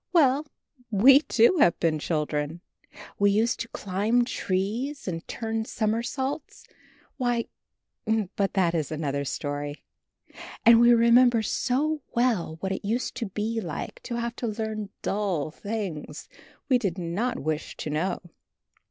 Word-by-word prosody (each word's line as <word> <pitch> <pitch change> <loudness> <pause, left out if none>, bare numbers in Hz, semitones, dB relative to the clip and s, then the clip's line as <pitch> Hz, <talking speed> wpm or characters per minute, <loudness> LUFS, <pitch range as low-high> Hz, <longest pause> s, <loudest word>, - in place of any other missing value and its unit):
Well, 295 -3 +4 0.4
we, 245 +6 +7
too, 270 +2 +3
have 175 - +4
been 160 -2 +1
children. 150 +1 -2 0.6
We 200 0 +5
used 220 +4 +2
to 230 - -3
climb 215 +3 0
trees 230 +8 -2
and 165 -2 -4
turn 225 -1 -3
somersaults; 245 +7 -2 0.5
why 245 -3 0 0.9
But 195 -1 0
that 180 -4 +2
is 160 -4 -1
another 140 -2 -2
story! 145 +1 -4 0.8
And 230 0 +8
we 240 0 +7
remember 235 0 +5
so 290 +8 0
well 225 -10 +1
what 190 - -2
it 190 - -3
used 230 +5 -1
to 230 - -2
be 215 +4 -2
like 165 -7 -6
to 240 - -5
have 235 0 -3
to 240 - -2
learn 215 -1 -3
dull 190 -8 -1
things 200 -5 -5 0.4
we 255 -3 +4
did 195 -6 -2
not 180 +8 -2
wish 155 +1 -3
to 150 - -4
know. 175 +6 -1
215 Hz, 135 wpm, -26 LUFS, 170-240 Hz, 0.9 s, And